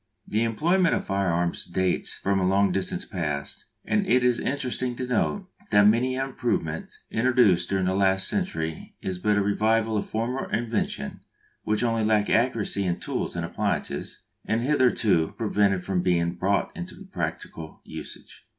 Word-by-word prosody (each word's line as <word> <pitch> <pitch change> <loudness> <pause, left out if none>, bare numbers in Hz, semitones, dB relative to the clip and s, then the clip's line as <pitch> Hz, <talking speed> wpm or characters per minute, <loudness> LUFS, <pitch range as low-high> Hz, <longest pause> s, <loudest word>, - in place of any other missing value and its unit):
The 110 +2 +1
employment 165 - +2
of - - -3
firearms 90 -3 0
dates 95 0 -1
from 100 0 0
a 90 - +2
long 100 0 +3
distant 95 +1 -2
past, 75 -6 -3 0.2
and 210 -2 +1
it 125 -5 +4
is 125 -1 +3
interesting 130 -2 -2
to 130 - -3
note 180 +10 0 0.2
that 105 -1 +5
many 120 +5 +3
an 135 +1 -2
improvement 80 -11 -2 0.2
introduced 115 -7 +3
during 95 -1 +1
the 95 - +1
last 95 0 +3
century 80 - -3
is 90 -1 -3
but 105 +3 +2
the 105 - +2
revival 110 +2 +1
of 100 - -1
a - - -14
former 120 +4 -2
invention 115 -10 -2 0.4
which 105 +2 0
only 115 -2 +1
lack 105 -1 +2
of - - +4
accuracy 115 -4 +1
in 90 -2 -1
tools - - -3
and - - -2
appliances - - -3 0.2
had 115 +1 +1
hitherto 120 - +2
prevented 100 -4 +1
from 95 -2 0
being 85 -1 +1
brought 95 +3 0
into 85 - -8
practical 80 -1 -5
usage. - - -10
105 Hz, 165 wpm, -26 LUFS, 95-120 Hz, 0.4 s, that